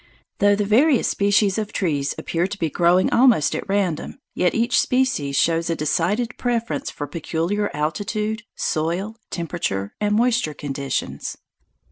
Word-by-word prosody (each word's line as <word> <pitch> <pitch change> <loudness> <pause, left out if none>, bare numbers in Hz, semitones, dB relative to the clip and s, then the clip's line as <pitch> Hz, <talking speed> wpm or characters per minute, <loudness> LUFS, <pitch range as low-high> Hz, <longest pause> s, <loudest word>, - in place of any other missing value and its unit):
Though 205 0 +5
the 205 0 -1
various 255 +6 +4
species 200 0 +2
of 210 -1 -4
trees 145 -6 -1
appear 170 +2 -1
to 200 +1 -6
be 165 -5 -1
growing 175 +2 +3
almost 235 - +4
at - - -5
random, 195 - -1 0.2
yet 180 -1 +1
each 235 +2 +2
species 245 - +1
shows 165 +2 +2
a 165 - +1
decided 185 +10 -1
preference 230 - -1
for 145 - -5
peculiar 170 +7 -2
altitude, 210 +8 -2
soil, 175 +7 -1
temperature, 155 - -3
and 210 0 +2
moisture 230 -9 +1
conditions. 140 -2 -4
190 Hz, 140 wpm, -22 LUFS, 160-215 Hz, 0.2 s, Though